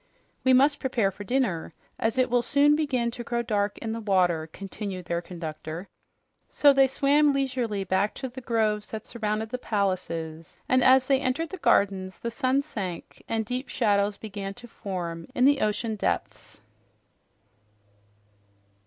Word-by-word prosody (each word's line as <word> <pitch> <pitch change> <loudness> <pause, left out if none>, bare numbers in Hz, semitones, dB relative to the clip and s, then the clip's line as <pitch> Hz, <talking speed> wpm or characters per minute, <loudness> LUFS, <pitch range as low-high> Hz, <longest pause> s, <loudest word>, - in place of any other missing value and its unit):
"We 260 - +4
must 280 +3 +5
prepare 235 -7 +1
for 205 +2 -9
dinner, 205 -9 -1 0.2
as 225 +3 0
it 255 -1 +2
will 245 0 +4
soon 285 +4 +4
begin 260 -6 0
to 240 0 -6
grow 235 0 -1
dark 205 -3 -1
in 225 - -4
the 225 - -3
water," 180 -6 +2
continued 195 -1 -6
their 170 0 -1
conductor. 165 0 -7 0.6
So 285 -1 +5
they 270 0 +5
swam 285 +3 +3
leisurely 250 -7 -1
back 190 +2 0
to 265 - -4
the 260 +1 -9
groves 215 -3 0
that 220 -1 -6
surrounded 220 -1 -2
the 250 - -3
palaces, 170 -7 -3
and 255 -1 +3
as 260 0 +6
they 270 0 +3
entered 280 +5 -1
the 380 - -5
gardens 190 - +2
the 235 - -4
sun 260 +2 +1
sank, 190 - -6
and 225 -1 0
deep 250 +3 -4
shadows 205 -3 +1
began 200 -2 -6
to 240 - -12
form 175 -6 -5
in 250 - +4
the 285 0 +4
ocean 215 +1 -1
depths. - - -3
220 Hz, 160 wpm, -26 LUFS, 195-255 Hz, 0.6 s, as